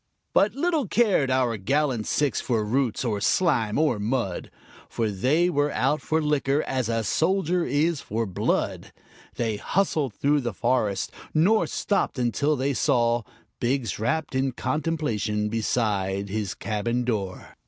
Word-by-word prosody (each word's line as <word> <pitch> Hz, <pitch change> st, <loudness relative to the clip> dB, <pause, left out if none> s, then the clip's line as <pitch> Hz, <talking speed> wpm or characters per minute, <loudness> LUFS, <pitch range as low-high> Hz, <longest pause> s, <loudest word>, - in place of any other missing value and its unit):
But 205 Hz, +3 st, +3 dB
little 310 Hz, -3 st, 0 dB
cared 200 Hz, -, +2 dB
our 130 Hz, -3 st, +1 dB
gallant 130 Hz, +2 st, 0 dB
six 145 Hz, -2 st, +1 dB
for 115 Hz, -4 st, 0 dB
roots, 125 Hz, +2 st, 0 dB
or 105 Hz, -4 st, -1 dB
slime, 115 Hz, -, +2 dB
or 150 Hz, -8 st, +2 dB
mud, 105 Hz, -4 st, -2 dB, 0.4 s
For 110 Hz, -2 st, -1 dB
they 135 Hz, -, +2 dB
were 145 Hz, -4 st, +1 dB
out 150 Hz, -, +1 dB
for 160 Hz, 0 st, 0 dB
liquor 150 Hz, -1 st, +1 dB
as 130 Hz, -3 st, -2 dB
a 115 Hz, -1 st, 0 dB
soldier 175 Hz, -, +1 dB
is 150 Hz, +1 st, +1 dB
for 115 Hz, +2 st, -2 dB
blood; 95 Hz, -3 st, -2 dB, 0.4 s
They 115 Hz, -3 st, -1 dB
hustled 150 Hz, -, 0 dB
through 145 Hz, +4 st, +2 dB
the 120 Hz, -5 st, -4 dB
forest, 115 Hz, -5 st, 0 dB, 0.2 s
nor 195 Hz, +8 st, +4 dB
stopped 200 Hz, -, -1 dB
until 125 Hz, +5 st, +1 dB
they 140 Hz, +1 st, 0 dB
saw 120 Hz, -4 st, +2 dB, 0.4 s
Biggs, 125 Hz, -2 st, -1 dB
wrapt 140 Hz, +8 st, -1 dB
in 130 Hz, 0 st, 0 dB
contemplation, 125 Hz, -8 st, -1 dB
beside 100 Hz, -3 st, -1 dB
his 105 Hz, -2 st, -3 dB
cabin 115 Hz, +3 st, -2 dB
door. 100 Hz, -6 st, -3 dB
130 Hz, 145 wpm, -25 LUFS, 110-150 Hz, 0.4 s, nor